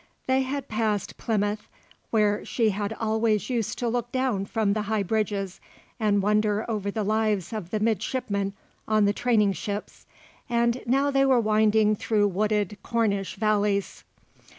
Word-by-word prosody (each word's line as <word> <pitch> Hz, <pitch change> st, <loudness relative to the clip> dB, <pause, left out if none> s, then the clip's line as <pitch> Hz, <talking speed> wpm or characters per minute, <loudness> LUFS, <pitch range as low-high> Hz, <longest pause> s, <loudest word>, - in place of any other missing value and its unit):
They 260 Hz, 0 st, +2 dB
had 270 Hz, +1 st, -3 dB
passed 215 Hz, -2 st, -1 dB
Plymouth 210 Hz, -1 st, -1 dB, 0.4 s
where 210 Hz, -2 st, +2 dB
she 225 Hz, -3 st, +1 dB
had 205 Hz, +1 st, -3 dB
always 220 Hz, 0 st, 0 dB
used 230 Hz, -4 st, -1 dB
to 245 Hz, -, -1 dB
look 240 Hz, 0 st, -2 dB
down 255 Hz, -7 st, 0 dB
from 210 Hz, -1 st, 0 dB
the 215 Hz, -, -1 dB
high 215 Hz, -2 st, +1 dB
bridges 200 Hz, -2 st, -2 dB, 0.4 s
and 205 Hz, -3 st, +2 dB
wonder 210 Hz, +1 st, +1 dB
over 210 Hz, -3 st, -2 dB
the 215 Hz, +1 st, -2 dB
lives 215 Hz, -3 st, 0 dB
of 210 Hz, -6 st, -5 dB
the 215 Hz, -, -1 dB
midshipmen 210 Hz, -2 st, -1 dB, 0.3 s
on 215 Hz, -1 st, +3 dB
the 205 Hz, -, +2 dB
training 210 Hz, -4 st, +2 dB
ships, 205 Hz, +4 st, -6 dB, 0.4 s
and 235 Hz, +1 st, +1 dB
now 275 Hz, +3 st, +2 dB
they 275 Hz, 0 st, +3 dB
were 265 Hz, -2 st, +4 dB
winding 215 Hz, -1 st, +3 dB
through 205 Hz, -1 st, +1 dB
wooded 210 Hz, 0 st, 0 dB
Cornish 210 Hz, -5 st, -1 dB
valleys. 205 Hz, -1 st, 0 dB
215 Hz, 150 wpm, -26 LUFS, 205-230 Hz, 0.4 s, were